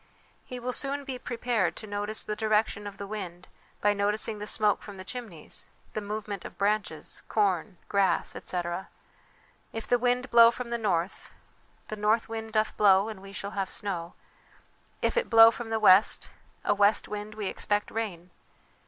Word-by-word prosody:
He 250 - -7
will 250 +1 -3
soon 280 +1 -1
be 260 -3 -5
prepared 230 -9 -1
to 220 - -8
notice 205 +1 -3
the 210 - -3
direction 215 -1 +1
of 200 -1 -8
the 200 - -6
wind 185 -4 -7 0.3
by 205 0 +4
noticing 210 +1 -1
the 210 - -5
smoke 210 -2 +2
from 205 -2 -10
the 185 - -7
chimneys, 200 -7 -6 0.3
the 215 - -2
movement 205 -2 -5
of - - -9
branches, 200 -6 -1
corn, 195 -2 +1
grass, 200 -2 +1
etc. 175 +1 -4 0.8
If 225 - -5
the 245 - +2
wind 250 +1 0
blow 230 -1 +9
from 240 0 -5
the 235 0 -2
north 185 -4 -1 0.6
The 215 - -4
north 215 +2 +2
wind 225 0 -5
doth 215 0 +1
blow 200 0 +5
and 210 -3 -8
we 195 0 -11
shall 200 0 -5
have 195 -2 -2
snow.' 175 -4 -4 0.9
If - - +1
it 485 - +1
blow 225 0 +9
from 235 -1 -6
the 225 0 0
west, 200 -1 +5 0.3
a - - +4
west 205 +1 +3
wind, 210 +1 -6
we 215 -1 -4
expect 205 +2 -1
rain. 185 -6 -4
210 Hz, 175 wpm, -28 LUFS, 195-225 Hz, 0.9 s, blow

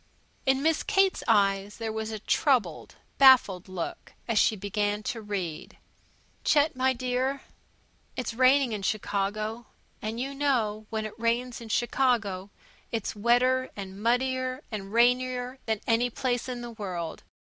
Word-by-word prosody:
In 265 +1 +3
Miss 320 -1 +2
Kate's 390 -2 +2
eyes 200 -2 +2
there 225 -1 -3
was 220 0 -3
a 220 - -4
troubled, 215 - 0 0.2
baffled 245 -9 +6
look 185 -2 -6
as 230 -3 +2
she 220 - +3
began 205 +1 -2
to 225 +1 -3
read: 185 -5 -5 0.7
Chet, 300 0 +3 0.2
dear, 255 +2 -1 0.7
it's 250 -2 -3
raining 255 +1 +4
in 210 -2 -3
Chicago. 215 +2 -2 0.3
And 220 +2 -4
you 270 +2 -3
know 230 -7 0
when 220 -1 -2
it 215 - -6
rains 235 +1 -1
in 230 - -9
Chicago, 220 -6 0 0.4
it's 225 -2 -3
wetter, 250 +4 +2
and 195 0 -8
muddier, 255 +3 0
and 200 -2 -5
rainier 250 +2 +2
than 220 -2 0
any 235 +2 +2
place 245 +1 -2
in 245 -1 -4
the 240 0 -7
world. 185 -7 -5
230 Hz, 140 wpm, -27 LUFS, 205-255 Hz, 0.7 s, baffled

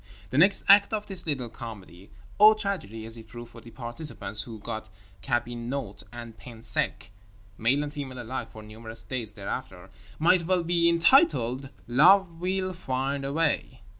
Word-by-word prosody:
The 130 - -1
next 195 +4 +5
act 200 +1 +7
of 210 -1 -1
this 185 -4 -6
little 135 -5 -1
comedy 100 -6 -10 0.3
(or 215 +1 +9
tragedy, 180 - -4
as 115 +1 -4
it 110 -1 -12
proved 120 +1 -10
for 115 - -12
the 115 - -13
participants, 120 -4 -5
who 115 +1 -7
got 110 0 -6 0.3
cabinot 120 -1 -3
and 120 -2 -9
pain 115 -2 -12
sec—male 105 +4 -2
and 145 0 -6
female 135 -4 -6
alike—for 115 -2 -6
numerous 110 +1 -9
days 120 -5 -4
thereafter) 100 -2 -6 0.3
might 170 +1 +3
well 185 -2 +2
be 170 0 +3
entitled 165 - +3 0.2
"Love 170 +7 +5
will 185 +1 -1
find 135 -3 -2
a 135 - -3
way." 150 -5 -1
125 Hz, 155 wpm, -27 LUFS, 110-165 Hz, 0.3 s, or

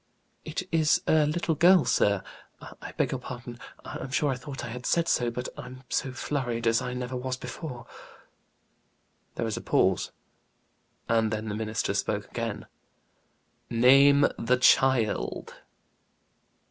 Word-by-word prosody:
"It 155 +3 -4
is 160 -2 +3
a 155 -1 +3
little 165 +2 0
girl, 175 +2 +5
sir. 100 -2 +2 0.4
I - - -10
beg - - 0
your 130 - -2
pardon, 120 -1 -8 0.3
I'm - - -6
sure 140 +1 +1
I - - -1
thought 135 0 -7
I - - -6
had 125 +2 -6
said 170 -1 +2
so; 120 -1 +1
but 125 +2 -5
I'm 130 +1 -10
so 130 - -1
flurried 125 -3 -3
as 115 +2 +3
I 125 0 -4
never 125 0 -4
was 130 0 -3
before." 125 -4 -7 1.5
There - - -2
was 110 -2 -3
a - - -5
pause, - - +1 1.0
and 115 -1 +2
then 110 0 -3
the 105 - -3
minister 110 0 -2
spoke - - -2
again. - - -4 1.0
"Name 135 +4 +6
the 125 +2 +2
child." 125 -3 +2
125 Hz, 145 wpm, -27 LUFS, 115-140 Hz, 1.5 s, Name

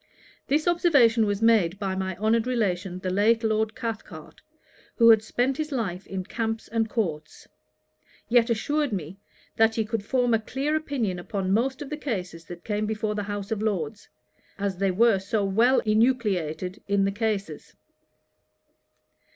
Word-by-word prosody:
This 300 +4 +1
observation 270 -11 +4
was 205 +1 -1
made 205 -6 +3
by 195 -1 -2
my 190 -1 -3
honoured 220 +3 +1
relation 190 -7 -1
the 185 0 -3
late 220 +4 +3
Lord 220 0 0
Cathcart, 230 -3 -7 0.5
who 230 -1 +6
had 220 -1 +5
spent 250 +4 -1
his 310 -1 -3
life 200 -8 -3
in 190 -1 -4
camps 225 +3 -3
and 225 0 -1
courts; 155 -10 -4 0.8
yet 240 0 +3
assured 290 +5 0
me, 185 -1 -5 0.4
that 225 0 +4
he 220 - 0
could 220 -1 -3
form 245 +1 +1
a 225 - +3
clear 270 +7 -2
opinion 255 - -2
upon 190 +1 -2
most 260 +6 0
of 285 - -11
the 300 - -3
causes 180 - -5
that 175 0 -10
came 210 0 -2
before 215 0 -2
the 210 - -2
House 205 +1 -5
of 215 -2 -1
Lords, 200 -4 -3 0.5
'as 200 -2 -2
they 195 +1 +1
were 210 +2 +3
so 200 +2 -1
well 230 +7 +3
enucleated 210 -6 0
in 200 -1 +2
the 195 - +1
Cases.' 200 -7 -3
215 Hz, 160 wpm, -25 LUFS, 195-235 Hz, 0.8 s, who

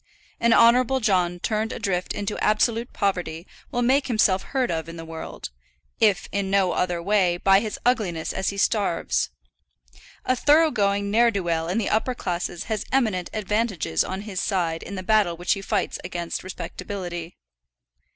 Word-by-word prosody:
An 235 - +3
Honourable 245 +3 +5
John 180 -6 +1
turned 220 +3 -1
adrift 180 -2 -2
into 205 0 -3
absolute 230 +2 +1
poverty 175 -4 -2 0.2
will 245 - -1
make 265 +3 +3
himself 215 -6 +3
heard 260 -3 -1
of 165 0 -3
in 165 - -8
the 165 - -7
world, 160 - -7 0.5
if 205 -4 +3
in 200 -1 -1
no 195 -2 +3
other 180 -1 0
way, 190 -3 +2
by 195 +2 +5
his 215 0 -4
ugliness 205 -10 0
as 190 - -1
he 200 - -5
starves. 200 -3 +1 1.0
A 255 - +2
thorough 305 +5 +4
going 200 -2 0
ne'er 235 +2 +5
do 200 -4 -2
well 165 -1 -1
in 180 +5 -1
the 225 - 0
upper 245 +4 +1
classes 175 -3 -3
has 220 -2 -3
eminent 215 -9 +1
advantages 210 - 0
on 190 +1 -4
his 205 -3 -4
side 170 -5 -1
in 200 - -7
the 185 - -5
battle 200 -4 +2
which 175 +1 +1
he 195 - -5
fights - - -1
against 175 -1 -4
respectability. 180 -2 -6
200 Hz, 170 wpm, -24 LUFS, 175-220 Hz, 1.0 s, Honourable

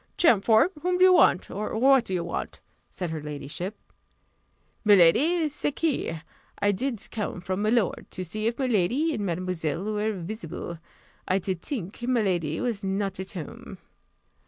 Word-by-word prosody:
"Champfort, 225 - +5
whom 360 +2 +1
do 365 - +4
you 370 0 +8
want 180 - +4
or 210 +2 -3
what 265 0 +5
do 190 - -4
you 175 - -1
want?" 170 - -5 0.3
said 180 -3 -5
her 160 -1 -4
ladyship. 150 +6 -5 1.1
"Miladi, 225 - +5
c'est 290 0 -2
que 305 - -1 0.4
I 205 0 +2
did 235 +2 -2
come 210 -4 -3
from 185 +2 -3
milord, 215 -1 +1
to 185 - -5
see 215 +5 -2
if 235 - -1
miladi 255 - +1
and 210 - -2
mademoiselle 175 -3 -2
were 215 +1 -1
visible. 175 -3 -6 0.5
I 185 - +2
did 185 -2 -3
tink 205 - -5
miladi 190 -11 0
was 230 -5 -2
not 195 -1 -2
at 190 +2 -5
home." 170 -6 -8
205 Hz, 155 wpm, -26 LUFS, 180-240 Hz, 1.1 s, you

